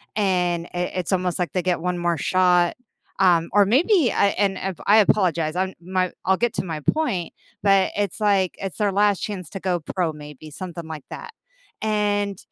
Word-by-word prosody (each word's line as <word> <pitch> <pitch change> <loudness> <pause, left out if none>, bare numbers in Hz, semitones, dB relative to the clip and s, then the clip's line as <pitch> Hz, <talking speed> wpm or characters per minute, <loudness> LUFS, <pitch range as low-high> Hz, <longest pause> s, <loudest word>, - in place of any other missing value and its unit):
and 180 -4 0
i 175 - -3 0.2
it's 180 - -3
almost 180 -1 0
like 175 - -1
they 180 - 0
get 175 -2 -1
1 180 0 -1
more 175 -1 0
shot, 180 -2 +2 0.4
um, 175 -3 +3
or 205 0 +5
maybe, 300 - +3
I - - +3
and 195 -2 +1
if 190 -3 -4
I 210 +2 +6
apologize, 175 -6 +2
I'm 190 0 -1
my 185 0 -1
I'll 190 0 +3
get 240 -1 0
to - - -1
my 160 -3 -4
point, 185 - -1 0.3
but 195 -2 +4
it's 205 0 -2
like, 195 -3 +2
it's 195 -2 -5
their 210 -2 +1
last 205 -1 +3
chance 190 -6 -5
to 195 - -7
go 180 -2 -1
pro, 170 0 -2
maybe, 150 0 -11
something 170 0 -7
like 155 -3 -7
that, - - -9 0.5
and, 205 -2 0
185 Hz, 190 wpm, -23 LUFS, 175-205 Hz, 0.5 s, I